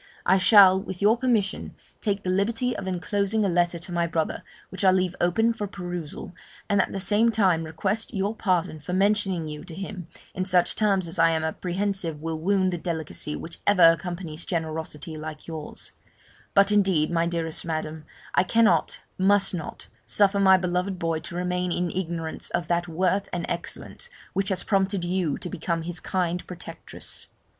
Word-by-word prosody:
I 190 +2 +4
shall, 190 -1 +7
with 190 -3 -7
your 210 +3 +5
permission, 235 -6 -1 0.3
take 205 -2 -1
the 185 - 0
liberty 230 +6 0
of 190 - -5
enclosing 200 +3 0
a - - +3
letter 175 0 +1
to 170 +2 -6
my 170 -1 +1
brother, 160 -1 -1 0.3
which 190 - -5
I 190 - +7
leave 185 -1 +2
open 225 +7 +3
for 210 -2 -4
perusal, 175 -4 -6 0.3
and 200 -1 +3
at - - -2
the 195 - -3
same 205 +4 +3
time 190 -7 +2
request 190 +8 -2
your 200 +2 -1
pardon 180 -6 0
for 150 +5 -6
mentioning 195 -3 +1
you 150 0 -7
to 175 -3 -10
him 190 -2 -6 0.3
in 185 - -2
such 180 -2 +2
terms 195 -4 +2
as 165 +1 -4
I 165 0 +6
am 160 -1 0
apprehensive 180 0 -2
will 160 0 -4
wound 185 +1 +1
the 175 - -3
delicacy 160 -3 -3
which 165 - -7
ever 205 -4 +5
accompanies 170 -2 -5
generosity 160 -1 -4
like 155 0 -7
yours; 160 -2 -7 0.6
but 200 +1 +5
indeed, 190 -7 +3
my 170 0 +1
dearest 165 -2 -2
Madam, 155 -1 -4 0.3
I - - +5
cannot, 210 -5 +2 0.2
must 195 +1 +3
not, 165 -4 -6 0.2
suffer 200 -1 +2
my 190 -1 +7
beloved 180 +1 -1
boy 165 -2 -1
to 170 - -7
remain 180 0 -1
in 175 0 0
ignorance 165 -3 -3
of 175 -1 -2
that 175 0 +1
worth 185 +4 0
and 175 -1 -2
excellence 485 - -5 0.2
which 195 +1 0
has 185 -2 -1
prompted 195 -2 +1
you 175 -4 0
to - - -6
become 165 0 -2
his 175 +1 -4
kind 180 -2 -2
protectress. 180 - -7
180 Hz, 180 wpm, -25 LUFS, 165-195 Hz, 0.6 s, shall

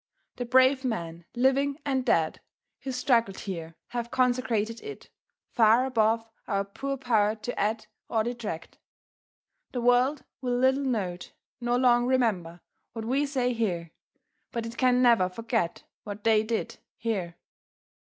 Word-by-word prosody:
The 245 - -3
brave 260 +2 +4
men, 170 -9 -3
living 270 +3 +2
and 265 -2 0
dead, 165 - +1 0.4
who 270 - -5
struggled 240 -6 +1
here 165 -4 -6
have 235 -1 -3
consecrated 240 -3 0
it, 430 -1 -9 0.4
far 230 +2 +5
above 225 -2 +1 0.2
our 200 0 0
poor 275 +7 -4
power 220 -5 +2
to 245 +3 -5
add 215 +2 0 0.2
or 220 -1 +1
detract. 225 -8 -5 0.9
The 245 - -2
world 250 +3 +3 0.2
will 245 -1 0
little 260 +2 +3
note, 195 -9 -2 0.3
nor 240 0 +1
long 245 -1 +4
remember, 200 -10 0 0.3
what 225 -1 -5
we 275 +5 +1
say 255 -3 0
here, 175 -8 -2 0.6
but 235 -1 -3
it 230 0 -7
can 255 0 +3
never 230 -7 +5
forget 225 -3 -2 0.2
what 205 0 -7
they 220 -1 +4
did 220 +1 -3 0.2
here. 190 -7 -3
235 Hz, 140 wpm, -27 LUFS, 210-255 Hz, 0.9 s, far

